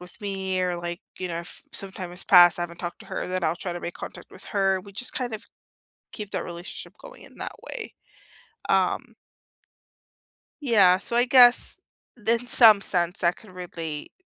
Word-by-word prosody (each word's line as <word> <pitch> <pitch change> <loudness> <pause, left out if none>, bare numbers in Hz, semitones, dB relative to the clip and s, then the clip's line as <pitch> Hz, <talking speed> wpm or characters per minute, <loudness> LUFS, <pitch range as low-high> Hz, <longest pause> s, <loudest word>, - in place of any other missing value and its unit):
with 180 +5 -13
me, 190 -2 -2
or, 180 -1 0
like, 175 0 -5 0.2
you 185 -1 -3
know, 170 0 -3
if 170 - -8
some 195 - -3
time 180 -2 -6
has 180 +2 -7
passed, 175 -2 +7
I - - -1
haven't 170 0 -6
talked 175 0 -6
to - - -13
her, - - -4
then 185 -1 -2
I'll 165 +2 +1
try 175 0 -4
to 175 - -6
make 175 - -5
contact - - -9
with - - -10
her. 195 -2 +1
We 200 +1 -14
just 245 +5 -3
kind 245 -3 -3
of 215 - -7 0.7
keep 210 -3 -8
the - - -2
relationship 175 0 -8
going - - -13
in - - -15
that - - -5 0.2
way, 450 -3 -6 0.8
um - - +1 1.5
Yeah. 195 -8 +5
So, 235 +4 -2
I 245 - +5
guess, 245 -1 +5 0.4
in 235 +2 +2
some 220 -4 +7
sense, 175 -1 -1
I 170 - +5
could 210 +2 -16
relate 165 -4 -6
185 Hz, 195 wpm, -25 LUFS, 175-215 Hz, 1.5 s, passed